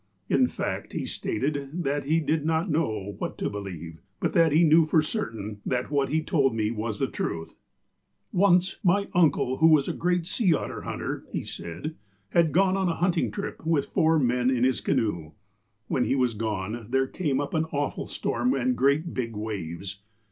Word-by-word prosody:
In 130 -2 +4
fact, - - -4
he - - -2
stated 140 +7 -2
that 140 0 -1
he 160 +3 +2
did 155 -1 0
not 160 +2 0
know 110 -10 -1
what - - -4
to - - -2
believe, 85 -5 -7 0.2
but - - -1
that 165 -2 +4
he 160 +4 +5
knew 160 0 +5
for 155 0 +3
certain 110 - -4
that 125 +2 -2
what 140 -2 +1
he 160 +1 0
told 135 -7 +2
me 110 -1 0
was 110 -1 -3
the - - +1
truth: 80 0 -4 0.8
''Once, 180 -1 +3
my 200 +2 +2
uncle, 150 -6 +3
who 160 - +5
was 155 -4 +5
a - - -1
great 175 0 0
sea 185 -2 +2
otter - - -4
hunter," - - -4
he - - -3
said, 85 - -6 0.4
"had 170 -3 +3
gone 190 +3 +3
on 190 -2 +1
a 165 - -1
hunting 175 0 +1
trip, 200 - -6
with 160 -3 +1
four 160 0 +3
men, 125 -2 +2
in 125 -2 +1
his 130 0 +2
canoe. 85 -8 -1 0.5
While 130 - 0
he 135 - +2
was 125 -3 +2
gone, 110 +1 -3
there 135 +1 +2
came 140 -1 -1
up 145 0 -3
an 160 0 +1
awful 145 -3 -3
storin, 125 +3 0
and 125 0 +1
great 140 +7 +2
big 115 -3 -3
waves. 100 -2 -5
140 Hz, 190 wpm, -26 LUFS, 115-160 Hz, 0.8 s, he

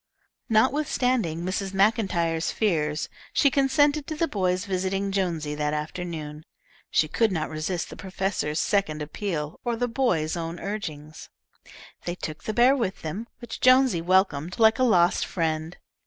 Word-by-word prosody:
Notwithstanding 245 - +1
Mrs. 190 +1 -3
Maclntyre's 190 -6 +1
fears, 155 -8 0 0.3
she 280 - +4
consented 285 +2 +2
to 315 - -4
the 330 +2 +1
boys 185 - 0
visiting 195 0 -1
Jonesy 170 -6 -1
that 150 0 -1
afternoon. 155 -1 -5 0.5
She 155 - +2
could 220 +7 +1
not 160 -4 -2
resist 160 +3 -3
the - - -7
professor's 190 -5 -2
second 155 -7 0
appeal 155 -1 -4
or 240 -1 -1
the 245 +2 -1
boys' 205 - 0
own 170 0 -4
urging. 155 -7 -5 0.9
They 175 - -2
took 155 -3 -7
the - - -1
bear 250 +3 +5
with 215 -8 -2
them, 190 +9 -4
which 240 -2 -8
Jonesy 255 -8 +5
welcomed 180 -2 +1
like 220 +2 +5
a - - +4
lost 175 -8 +4
friend. 160 -1 -2
185 Hz, 145 wpm, -26 LUFS, 160-225 Hz, 0.9 s, bear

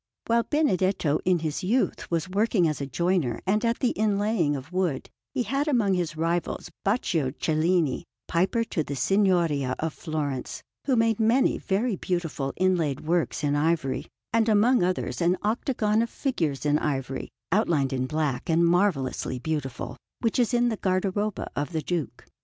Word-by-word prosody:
While 235 0 +3
Benedetto 190 - +2
in 185 -1 +4
his 155 +2 -2
youth 235 +8 0
was 165 -1 0
working 195 -2 +2
as 150 -2 -2
a 140 - -3
joiner 170 -3 0
and 210 +4 +1
at 235 0 +1
the 250 - +3
inlaying 205 -6 +1
of 140 +4 -7
wood, 180 -7 -1 0.2
he 260 -3 -1
had 275 +7 -1
among 230 -9 +2
his 170 -4 -1
rivals 165 +2 -1
Baccio 180 - +1
Cellini, 160 -2 +1 0.2
piper 185 +7 +1
to 165 -8 -2
the 145 - -5
Signoria 165 -4 +2
of 160 -1 -2
Florence, 145 -5 -4 0.2
who 265 - +2
made 225 -1 +2
many 230 +4 +3
very 210 +3 0
beautiful 165 -7 -2
inlaid 175 -7 +1
works 170 0 0
in 145 0 +2
ivory, 150 -2 0 0.3
and 230 0 +3
among 220 +3 +4
others 180 0 -1
an 175 +2 +3
octagon 220 0 +1
of 235 - -1
figures 160 - -2
in 150 0 +3
ivory, 135 -2 -3 0.2
outlined 165 -9 +2
in 130 0 -1
black 150 +1 -2
and 165 +1 +4
marvellously 170 -9 +1
beautiful, 135 -3 -4 0.2
which 230 +1 0
is 240 - +2
in 240 0 +3
the 220 - -2
guardaroba 195 +2 -1
of 145 +4 -3
the 160 - 0
Duke. 170 -6 -3
175 Hz, 165 wpm, -26 LUFS, 150-215 Hz, 0.3 s, in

